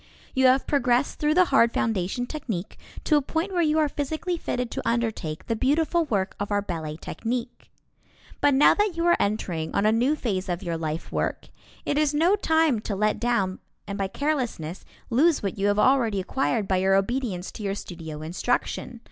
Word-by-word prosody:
You 265 Hz, -1 st, +4 dB
have 260 Hz, +1 st, +4 dB
progressed 255 Hz, -1 st, +1 dB
through 300 Hz, +1 st, +2 dB
the 365 Hz, 0 st, +6 dB
hard 235 Hz, -3 st, +5 dB
foundation 220 Hz, +2 st, 0 dB
technique 220 Hz, -, -5 dB, 0.2 s
to 305 Hz, -, +3 dB
a -, -, +2 dB
point 320 Hz, +7 st, -2 dB
where 350 Hz, -, +2 dB
you 310 Hz, -1 st, +2 dB
are 310 Hz, -1 st, +3 dB
physically 310 Hz, +5 st, -3 dB
fitted 250 Hz, -7 st, -3 dB
to -, -, -3 dB
undertake 220 Hz, -10 st, -2 dB
the 230 Hz, -, -1 dB
beautiful 320 Hz, +7 st, +1 dB
work 200 Hz, -8 st, -1 dB
of 205 Hz, -, -3 dB
our 205 Hz, -, +2 dB
ballet 160 Hz, -5 st, -5 dB
technique. 240 Hz, +7 st, -5 dB, 0.7 s
But 285 Hz, -2 st, +4 dB
now 280 Hz, -, +6 dB
that 415 Hz, -5 st, 0 dB
you 335 Hz, -, 0 dB
are 345 Hz, -, +5 dB
entering 180 Hz, -6 st, -2 dB
on 200 Hz, -, +2 dB
a 215 Hz, -, +5 dB
new 245 Hz, +7 st, +2 dB
phase 195 Hz, -10 st, -2 dB
of 175 Hz, 0 st, -2 dB
your 170 Hz, -2 st, -2 dB
life 160 Hz, 0 st, -4 dB
work, -, -, -2 dB, 0.4 s
it 290 Hz, -, +1 dB
is 300 Hz, -1 st, +1 dB
no 340 Hz, +6 st, +4 dB
time 320 Hz, -, +2 dB
to 210 Hz, -1 st, -4 dB
let 210 Hz, +2 st, +1 dB
down 205 Hz, -6 st, 0 dB, 0.3 s
and 200 Hz, -, -5 dB
by 195 Hz, -1 st, -1 dB
carelessness 240 Hz, -, -3 dB, 0.3 s
lose 295 Hz, +5 st, +3 dB
what 195 Hz, 0 st, -3 dB
you 200 Hz, -, +2 dB
have 205 Hz, 0 st, +2 dB
already 230 Hz, -4 st, +3 dB
acquired 220 Hz, +1 st, -1 dB
by 190 Hz, -, +2 dB
your 190 Hz, +1 st, +3 dB
obedience 195 Hz, -3 st, -1 dB
to -, -, -10 dB
your 195 Hz, -1 st, -1 dB
studio 160 Hz, -5 st, -7 dB
instruction. 235 Hz, +7 st, -2 dB
235 Hz, 195 wpm, -25 LUFS, 195-290 Hz, 0.7 s, the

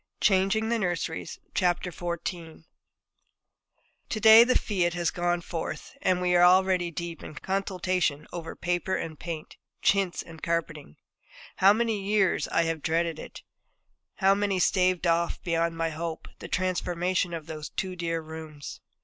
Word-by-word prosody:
XIV -, -, -55 dB
CHANGING 195 Hz, +3 st, +3 dB
THE 235 Hz, 0 st, +1 dB
NURSERIES 175 Hz, -4 st, -3 dB, 0.2 s
To 175 Hz, -2 st, -2 dB, 1.5 s
day 220 Hz, +1 st, +9 dB
the 255 Hz, +1 st, +3 dB
fiat 180 Hz, -5 st, 0 dB
has 175 Hz, -1 st, 0 dB
gone 175 Hz, 0 st, 0 dB
forth, 170 Hz, +8 st, -6 dB
and 185 Hz, -6 st, +2 dB
we 180 Hz, 0 st, +1 dB
are 175 Hz, -, +6 dB
already 185 Hz, -1 st, +4 dB
deep 170 Hz, 0 st, -6 dB
in -, -, -9 dB
consultation 185 Hz, -5 st, -1 dB
over 165 Hz, -2 st, -6 dB
paper 175 Hz, +2 st, -1 dB
and 160 Hz, -2 st, -5 dB
paint, 165 Hz, -2 st, -7 dB, 0.3 s
chintz, 195 Hz, -3 st, +2 dB
and 165 Hz, -2 st, -13 dB
carpeting. 165 Hz, -, -3 dB, 0.6 s
How 195 Hz, +1 st, +7 dB
many 220 Hz, -1 st, 0 dB
years 200 Hz, -2 st, +2 dB
I 165 Hz, -, +2 dB
have 165 Hz, -2 st, -2 dB
dreaded 165 Hz, 0 st, 0 dB
it; -, -, -10 dB, 0.7 s
how 195 Hz, 0 st, +4 dB
many 200 Hz, -1 st, 0 dB
staved 185 Hz, -1 st, +2 dB
off, 170 Hz, 0 st, +1 dB
beyond 165 Hz, -1 st, 0 dB
my 165 Hz, 0 st, -1 dB
hope, 160 Hz, +1 st, -5 dB
the -, -, -8 dB
transformation 180 Hz, -1 st, 0 dB
of 165 Hz, -3 st, -5 dB
those 155 Hz, -2 st, -7 dB
two 185 Hz, -1 st, -4 dB
dear 165 Hz, -2 st, -2 dB
rooms! 155 Hz, -2 st, -9 dB
175 Hz, 145 wpm, -27 LUFS, 165-190 Hz, 1.5 s, day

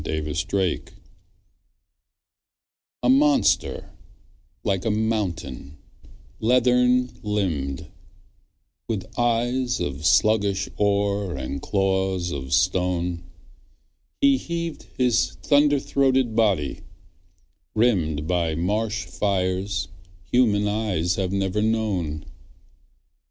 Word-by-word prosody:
Megalosaurus 80 Hz, +4 st, -1 dB, 2.2 s
A 125 Hz, -, +3 dB
MONSTER 145 Hz, +2 st, +2 dB, 0.7 s
like 95 Hz, -2 st, 0 dB
a 115 Hz, -, 0 dB
mountain, 100 Hz, -, -2 dB, 0.6 s
leathern 125 Hz, +1 st, +3 dB
limbed, 85 Hz, -11 st, -2 dB, 1.0 s
With 105 Hz, -5 st, -3 dB
eyes 120 Hz, +1 st, 0 dB
of 70 Hz, +1 st, -4 dB
sluggish 100 Hz, +1 st, +3 dB
ore 100 Hz, -2 st, 0 dB
and 70 Hz, +1 st, -4 dB
claws 95 Hz, -2 st, 0 dB
of 65 Hz, -2 st, -5 dB
stone, 90 Hz, +1 st, 0 dB, 0.9 s
He 280 Hz, -1 st, +5 dB
heaved 170 Hz, -6 st, -5 dB
his 120 Hz, -2 st, +2 dB
thunder 145 Hz, 0 st, +4 dB
throated 130 Hz, -4 st, +1 dB
body, 100 Hz, -11 st, +1 dB, 1.0 s
rimmed 85 Hz, -10 st, +1 dB
By 85 Hz, -3 st, 0 dB
marsh 105 Hz, +5 st, -1 dB
fires 95 Hz, -1 st, -1 dB, 0.4 s
human 105 Hz, -5 st, +3 dB
eyes 100 Hz, -5 st, 0 dB
have 95 Hz, -2 st, -1 dB
never 100 Hz, +1 st, 0 dB
known. 105 Hz, -9 st, -1 dB
100 Hz, 80 wpm, -24 LUFS, 90-115 Hz, 2.2 s, He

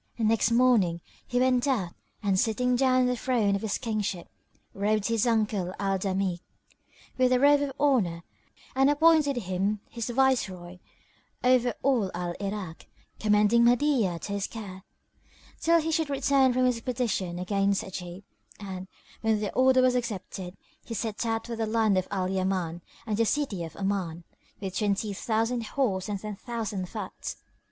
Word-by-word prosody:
Next 225 Hz, -1 st, +2 dB
morning 230 Hz, -8 st, +3 dB, 0.3 s
he 245 Hz, -, 0 dB
went 255 Hz, +1 st, +2 dB
out 200 Hz, -11 st, 0 dB, 0.3 s
and 195 Hz, -2 st, +2 dB
sitting 250 Hz, +3 st, +1 dB
down 255 Hz, 0 st, +3 dB
on -, -, +3 dB
the 250 Hz, 0 st, +1 dB
throne 230 Hz, -5 st, +1 dB
of 200 Hz, -, -3 dB
his 220 Hz, -3 st, -1 dB
kingship, 210 Hz, -6 st, -3 dB, 0.5 s
robed 210 Hz, +1 st, 0 dB
his 230 Hz, 0 st, +1 dB
uncle 210 Hz, -5 st, 0 dB
Al 195 Hz, -1 st, 0 dB
Damigh 190 Hz, -2 st, -1 dB, 0.8 s
with 255 Hz, 0 st, +4 dB
a 250 Hz, -, +4 dB
robe 285 Hz, +1 st, +5 dB
of 285 Hz, -1 st, -1 dB
honour; 215 Hz, -13 st, +2 dB, 0.5 s
and 270 Hz, +1 st, +4 dB
appointed 300 Hz, -1 st, +4 dB
him 200 Hz, -1 st, -1 dB
his 235 Hz, 0 st, -4 dB
viceroy 200 Hz, -9 st, 0 dB, 0.6 s
over 250 Hz, -1 st, +3 dB
all 250 Hz, -8 st, +2 dB
Al 175 Hz, 0 st, -3 dB
Irak, 195 Hz, -4 st, -5 dB, 0.3 s
commending 210 Hz, +2 st, +4 dB
Mahdiyah 240 Hz, -, +3 dB
to 200 Hz, -, -4 dB
his 200 Hz, -1 st, -2 dB
care, 195 Hz, -4 st, -8 dB, 0.8 s
till 335 Hz, +1 st, +4 dB
he 325 Hz, 0 st, -2 dB
should 320 Hz, -2 st, 0 dB
return 275 Hz, -1 st, +3 dB
from 255 Hz, +1 st, +2 dB
his 250 Hz, -2 st, +2 dB
expedition 225 Hz, -7 st, -2 dB
against 195 Hz, +2 st, 0 dB
Ajib; 185 Hz, -1 st, -7 dB, 0.4 s
and, 190 Hz, -2 st, -7 dB, 0.3 s
when 220 Hz, -1 st, +2 dB
the 210 Hz, -1 st, -3 dB
order 260 Hz, 0 st, +4 dB
was 255 Hz, -1 st, +4 dB
accepted, 195 Hz, -6 st, -4 dB, 0.3 s
he 230 Hz, -, -6 dB
set 220 Hz, +1 st, -3 dB
out 225 Hz, 0 st, -1 dB
for 235 Hz, -, -5 dB
the 225 Hz, -1 st, -2 dB
land 220 Hz, -2 st, +2 dB
of 185 Hz, -1 st, 0 dB
Al 190 Hz, -2 st, -1 dB
Yaman 185 Hz, -3 st, -1 dB, 0.2 s
and 215 Hz, -3 st, -1 dB
the 230 Hz, -, +3 dB
City 245 Hz, -12 st, -1 dB
of 165 Hz, -2 st, -8 dB
Oman 190 Hz, -4 st, -2 dB, 0.4 s
with 190 Hz, -2 st, -5 dB
twenty 205 Hz, 0 st, 0 dB
thousand 225 Hz, +4 st, -1 dB
horse 220 Hz, -5 st, -1 dB
and 205 Hz, -1 st, -2 dB
ten 210 Hz, 0 st, -6 dB
thousand 215 Hz, -6 st, -4 dB
foot. 210 Hz, -4 st, -6 dB
215 Hz, 160 wpm, -27 LUFS, 190-250 Hz, 0.8 s, robe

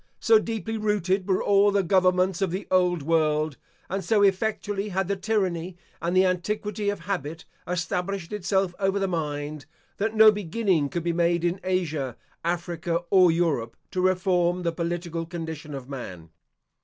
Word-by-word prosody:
So 445 Hz, -1 st, +5 dB
deeply 225 Hz, -, -3 dB
rooted 200 Hz, -2 st, 0 dB
were 190 Hz, -, +2 dB
all 200 Hz, 0 st, +4 dB
the 200 Hz, -1 st, +2 dB
governments 185 Hz, 0 st, +2 dB
of 195 Hz, -, +2 dB
the 185 Hz, +4 st, -4 dB
old 180 Hz, -4 st, +2 dB
world, 155 Hz, -2 st, +1 dB, 0.3 s
and 195 Hz, +1 st, -3 dB
so 205 Hz, +3 st, +3 dB
effectually 205 Hz, +1 st, 0 dB
had 190 Hz, -1 st, -1 dB
the 200 Hz, -, 0 dB
tyranny 185 Hz, -4 st, -1 dB, 0.2 s
and 175 Hz, +2 st, 0 dB
the 190 Hz, -, +6 dB
antiquity 205 Hz, +3 st, -1 dB
of 205 Hz, -3 st, -3 dB
habit 165 Hz, -4 st, -4 dB, 0.2 s
established 180 Hz, +2 st, -2 dB
itself 195 Hz, -2 st, 0 dB
over 195 Hz, 0 st, +1 dB
the 195 Hz, -1 st, 0 dB
mind, 150 Hz, -4 st, -4 dB, 0.3 s
that 220 Hz, +2 st, -1 dB
no 220 Hz, 0 st, +8 dB
beginning 190 Hz, -6 st, 0 dB
could 170 Hz, +2 st, -3 dB
be 170 Hz, 0 st, 0 dB
made 170 Hz, 0 st, +1 dB
in 175 Hz, +2 st, 0 dB
Asia, 155 Hz, -9 st, -1 dB, 0.3 s
Africa, 170 Hz, 0 st, -2 dB
or 185 Hz, -2 st, +6 dB
Europe, 160 Hz, -9 st, 0 dB
to 185 Hz, -, -1 dB
reform 180 Hz, -1 st, +2 dB
the 170 Hz, -, +1 dB
political 170 Hz, 0 st, -3 dB
condition 160 Hz, -3 st, -6 dB
of 130 Hz, -2 st, -8 dB
man. 90 Hz, -, -8 dB
180 Hz, 160 wpm, -26 LUFS, 165-195 Hz, 0.3 s, no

